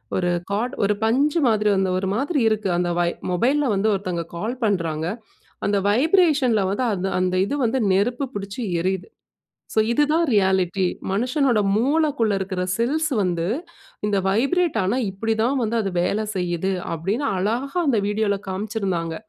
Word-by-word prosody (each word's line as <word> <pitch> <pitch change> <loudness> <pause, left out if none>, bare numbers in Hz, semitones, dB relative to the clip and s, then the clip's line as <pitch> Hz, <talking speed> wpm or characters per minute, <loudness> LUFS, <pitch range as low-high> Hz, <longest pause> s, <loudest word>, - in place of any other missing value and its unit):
ஒரு 180 -1 +1 0.2
கார்ட், 235 +6 -1
ஒரு 205 +1 +3
பஞ்சு 280 +8 +2
மாதிரி 210 -2 +2
வந்து 190 0 +1
ஒரு 190 - -2
மாதிரி 285 +3 0
இருக்கு, 215 -2 -1
அந்த 175 0 0 0.4
மொபைலில 260 +8 +2
வந்து 200 +3 +1
ஒருத்தவங்க 185 -4 -3
கால் 235 +8 -4
பண்ணுறாங்க, 165 -6 -1 0.6
அந்த 200 0 +2
வைப்ரேஷனில 275 - +3
வந்து 250 +6 -1
அந்த 190 -1 -2
அந்த 185 0 0
இது 285 - -2
வந்து 235 +3 +1
நெருப்பு 240 +8 +1
பிடிச்சு 200 +4 -5 0.2
எரியுது. 185 +2 -2 0.7
ஸோ, - - +2
இதுதான் 300 +6 +2
ரியாலிட்டி 190 -2 +2 0.3
மனுஷனோட 250 +3 +1 0.2
மூளக்குள்ள 275 -2 +1
இருக்கிற 190 -1 -3 0.2
செல்ஸ் 295 +7 +1
வந்து 175 -3 0 0.6
இந்த 205 -1 +1
வைப்ரேட் 275 - +1
ஆனா, 200 +7 0
இப்படி 225 +4 -1
தான் 265 +3 +1
வந்து 225 +1 -1
அது 195 -2 -2
வேல 215 +4 0
செய்யுது 180 0 -1 0.2
அப்படினு 195 - -2
அழகா 235 - -1
அந்த 240 -6 +3
வீடியோல 205 -1 0
காம்சிருந்தாங்க. 190 -4 -2
210 Hz, 145 wpm, -22 LUFS, 190-255 Hz, 0.7 s, ஒரு